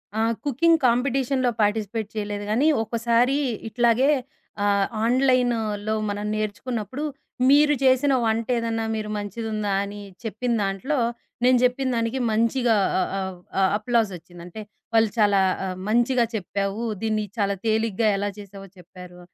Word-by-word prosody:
ఆ! - - -1 0.3
కుకింగ్ 325 +5 +3
కాంపిటీషన్‌లో 255 +1 +1
పార్టిసిపేట్ 210 +1 -1
చేయలేదు 205 -1 -3
గానీ, 265 +8 +3 0.2
ఒకసారి 235 +4 +1 0.3
ఇట్లాగే 240 +4 +3 0.6
ఆహ్, 200 -1 +3 0.2
ఆన్‌లై‌న్‌లో 235 -5 +1 0.2
మనం 205 +1 -3
నేర్చుకున్నప్పుడు. 220 +5 -4 0.5
మీరు 295 +1 +5
జేసిన 265 +1 +4
వంటేదన్నా 225 0 0
మీరు 215 -1 -3
మంచిదుందా 210 0 -3
అని 205 +1 -7 0.2
చెప్పిన 230 +3 -2
దాంట్లో, 200 +10 -1 0.5
నేను 255 0 +5
జెప్పిన 255 +1 +1
దానికి 230 +3 -1
మంచిగా 230 +1 +2 0.4
ఆహ్, 190 -1 -4 0.3
ఆహ్, 190 - +4
అప్‌లాజొచ్చింది. 200 -7 -2
అంటే 195 +5 -9 0.3
వాళ్ళు 225 -1 +4
చాలా 205 -2 +4 0.2
ఆహ్, 185 -1 -4
మంచిగా 240 +2 +3
చెప్పావు. 200 +2 -3 0.2
దీన్ని 215 -1 0
చాలా 200 -1 +1
తేలిగ్గా 220 0 +1
ఎలా 205 +1 -1
చేసావో 195 -1 -11
చెప్పారు 180 0 -13
225 Hz, 120 wpm, -24 LUFS, 205-245 Hz, 0.6 s, మీరు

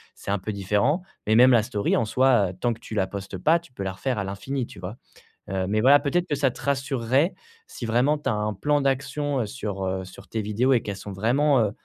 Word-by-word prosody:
c'est - - -9
un 100 - +2
peu 100 +4 -4
différent, 105 - +1 0.3
mais 110 - +4
même 125 +2 +7
la 115 -3 +5
story, 105 -3 0
en - - +2
soi, 120 -4 +3
heu, - - -7
tant 120 -1 +1
que 115 - -13
tu 115 - -10
la 95 -2 +1
postes 100 -1 -6
pas, 160 - +3
tu 170 -6 -20
peux 100 - -8
la 95 - -3
refaire 110 +4 -2
à - - -1
l'infini, 120 +6 -4
tu - - -14
vois? 95 +6 -7 0.5
Heu, 95 -1 -1
mais 110 +2 +1
voilà, 140 +3 +7
peut-être 175 +5 0
que 145 - 0
ça 135 -1 +2
te - - -12
rassurerait, 135 - 0 0.3
si 120 - -7
vraiment 125 +7 +2
tu 145 -2 -3
as 120 - +1
un 105 0 -1
plan 145 +10 +1
d'action, 140 +1 -1
heu, 110 - -1
sur, 100 -6 -5
heu 95 0 -2
sur 90 - -13
tes 110 - -2
vidéos 105 +6 +1
et 120 - +3
qu'elles 100 -2 -5
sont 100 +1 -8
vraiment, 130 +8 +2
heu, 105 -2 +1
115 Hz, 260 wpm, -25 LUFS, 100-135 Hz, 0.5 s, même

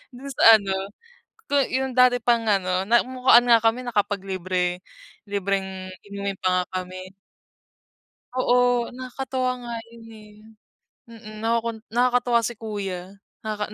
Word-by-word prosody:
do'n 275 +3 -9
sa 225 -1 +9
ano, 195 -2 -3 0.8
ko - - -4 0.2
yung 260 0 -1
dati 250 0 +5
pang 235 -2 +2
ano, 185 -2 +1
namukhaan 245 +1 +4
nga 235 - +8
kami 225 +3 +2
nakapaglibre 190 -5 -1 0.5
libreng 190 -1 -3 0.2
inumin 200 -1 -4
pa 185 0 +2
nga - - -15 0.2
kami. 185 +1 -9 1.3
Oo, 245 -1 +3
nakakatuwa 255 0 -3
nga 235 - -5 0.2
'yon, 230 -1 -14
eh, 215 -1 -14 0.8
mm. 215 -2 -11
Nakukun 230 0 -1 0.2
nakakatuwa 245 -1 +2
si 240 - -3
kuya, 195 -3 -5 0.2
nakaka 215 -1 -4
220 Hz, 120 wpm, -24 LUFS, 195-245 Hz, 1.3 s, sa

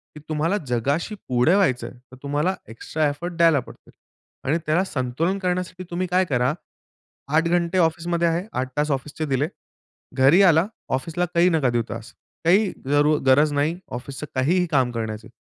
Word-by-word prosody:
की - - -9
तुम्हाला 160 +6 0
जगाशी 140 - -1
पुढे 125 +8 +3
व्हायचं 135 -11 +1
आहे, - - -12
तर - - -11
तुम्हाला 150 +6 0
एक्स्ट्रा 150 +7 -2
एफर्ट 170 +5 -5
द्यायला 165 -4 +5
पडते. - - -13 0.5
आणि 145 +5 +1
त्याला 155 +5 +2
संतुलन 155 +3 -1
करण्यासाठी 180 -1 -2
तुम्ही 180 +1 -2
काय 180 +1 +2
करा. 125 -3 +1 0.8
8 160 - +4
घंटे 175 +1 +1
ऑफिसमध्ये 170 0 +1
आहे. 170 +3 0
8 130 0 -2
तास 150 +1 +1
ऑफिसचे 145 +3 -3
दिले. 140 0 0 0.7
घरी 135 +8 +6
आला, 170 -1 +5 0.3
ऑफिसला 165 +7 -1
काही 170 +1 +4
नका 155 -7 +2
देऊ 120 -1 0
तास. 115 +1 -7 0.3
काही 195 +4 +4
जरू 145 +2 +3
गरज 145 +3 +5
नाही 150 +4 0 0.2
ऑफिसचं 135 +4 -7
काहीही 170 +8 +2
काम 130 -4 +2
करण्याची. 110 -2 -5
155 Hz, 165 wpm, -23 LUFS, 130-175 Hz, 0.8 s, घरी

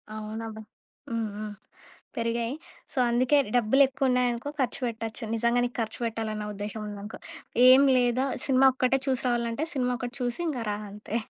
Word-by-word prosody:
అవునబ్బా! 220 +1 -6 0.5
హ్మ్. 230 -2 -2
హ్మ్. 210 0 -5 0.6
పెరిగాయి. 230 +1 -1 0.4
సో - - -4
అందుకే 255 +5 +3 0.2
డబ్బులెక్కువున్నాయనుకో 250 +1 +2
ఖర్చు 255 0 -1
పెట్టొచ్చు. 225 -1 -5
నిజంగా 235 +2 +2
నీకు 245 - -4
ఖర్చు 225 - -3
బెట్టాలన్న 220 -2 -3
ఉద్దేశ్యం 210 +2 -5
ఉందనుకో 205 +1 -7 0.5
ఏం 260 +2 +8 0.2
లేదా 250 +2 +2 0.2
సినిమా 270 -1 +5
ఒక్కటే 260 +1 +2
చూసి 265 -1 +1
రావాలనంటే 235 +3 0
సినిమా 250 -2 0
ఒకటి 245 +1 -5
చూసి 245 +4 -2
ఇంకా 260 -6 -2
రా 205 - -1
అంతే. 210 +2 -5
235 Hz, 145 wpm, -27 LUFS, 220-255 Hz, 0.6 s, ఏం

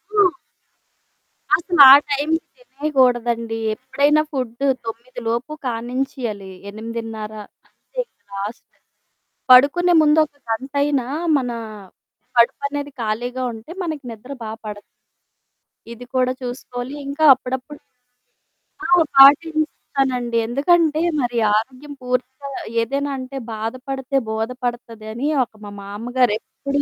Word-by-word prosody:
ఆ! 415 - +5 1.3
అసల 345 0 -2
ఆ - - +13 0.2
టైంకి 295 +3 +1 0.2
తినేగూడదండి. 245 - 0 0.2
ఎప్పుడైనా 285 +5 +2
ఫుడ్డు 255 -1 -3 0.2
9 235 +3 -7
లోపు 235 +5 -2
కానించేయాలి. 240 -4 -3 0.2
8:30 220 0 -6 0.3
అంతే - - -12
ఇంక 475 - -48
లాస్ట్. 200 +3 -5 0.9
పడుకునే 290 +8 +6
ముందు 305 0 +4
ఒక 290 -1 -23
గంటయినా 275 +2 0 0.3
మనా 245 -3 -3 0.8
కడుపనేది 280 +4 +1
ఖాళీగా 240 +4 -2
ఉంటే 225 +7 -11
మనకు 310 -5 -4
నిద్ర 230 +5 -11
బా 220 - -5 0.2
పడతది. 210 -1 -7 1.1
ఇది 240 +2 -11
కూడా 255 0 +2
చూసుకోవాలి. 245 +1 -6
ఇంకా 285 +3 -2
అప్పుడప్పుడు 260 +3 -6 1.1
ఆ! - - -1 0.3
పాటిస్తానండి. 275 -4 +4
ఎందుకంటే 310 +5 +2 0.2
మరి 245 -1 -2 0.2
ఆరోగ్యం 260 +6 -3
పూర్తిగా 255 +2 -3 0.3
ఏదైనా 280 +4 -2
అంటే, 260 +1 -7 0.2
"బాధపడితే 255 +5 -3
బోధపడతది" 235 0 -4
అని 255 +5 -2 0.2
ఒక 235 - -12
మా - - -7
మామగారు 230 +4 0
ఎప్పుడూ 280 +4 -3
255 Hz, 105 wpm, -21 LUFS, 230-285 Hz, 1.3 s, ఆ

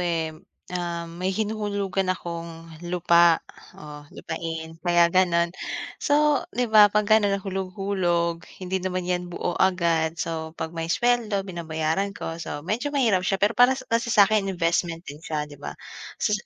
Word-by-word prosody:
eh, 165 -2 -1 0.4
um, 170 -1 -3
may 185 - 0
hinuhulugan 200 -2 -1
akong 170 -2 -5 0.2
lupa, 170 -1 +4 0.3
oh, 150 -1 -11
lupain 160 0 -6
kaya 175 0 +3
ganon. 170 -2 +3 0.5
So, 295 0 +3 0.2
di 250 - +2
ba, 210 -1 +9
'pag 210 +1 +1
ganun 205 -2 +4
nahulog-hulog 185 -3 -2 0.2
hindi 190 +1 -1
naman 185 -1 -2
yan 180 0 -2
buo 175 0 -3
agad, 170 -3 +2
so 160 0 -4
'pag 160 0 -4
may 165 -1 -4
sweldo 220 -1 +1
binabayaran 170 +2 -2
ko, 165 +1 -5
so 145 -1 -6
medyo 230 +9 -1
mahirap 240 -10 +2
siya 195 +1 0
pero 205 +4 +2
para 255 +2 +4
kasi 230 0 +1
sa'kin 210 -2 +4
investment 170 -1 0
din 145 +2 -9
siya, 155 -2 -3
di 145 -1 -14
ba. - - -7 0.4
So, 210 - 0
180 Hz, 150 wpm, -25 LUFS, 165-200 Hz, 0.5 s, ba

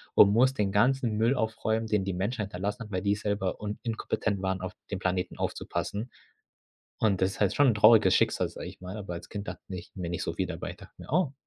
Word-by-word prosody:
und 100 - +8
muss 125 +5 +4
den 105 -6 0
ganzen 115 +1 +2
Müll 115 +5 +3
aufräumen, 110 -1 -1
den 105 -3 +1
die 95 - -1
Menschheit 105 +5 -1
hinterlassen 100 +4 -4
hat, 105 - -12
weil 95 -1 -1
die 100 0 +2
selber 100 -2 -2
un 105 0 -4
inkompetent 110 -3 -1
waren, 95 -1 -1
auf 95 0 -4 0.2
den 100 - -2
Planeten 90 -1 -1
aufzupassen. 105 +5 -3 0.9
Und 100 -4 +2
das 95 +1 +2
ist - - -10
halt 100 -3 +3
schon 145 - +5
'n 120 - +4
trauriges 105 -2 +6
Schicksal, - - +2
sage - - -8
ich - - -12
mal, 95 +2 -7
aber 100 -4 -6
als 85 - -8
Kind 105 -1 -6
dachte - - -6
ich 90 -2 -7
mir 90 -3 -4
nicht 85 0 -3
so - - -2
viel - - -1
dabei, - - -5
ich - - -9
dachte - - -14
mir: - - -11
„Oh“ 170 -4 +2
105 Hz, 240 wpm, -29 LUFS, 95-110 Hz, 0.9 s, und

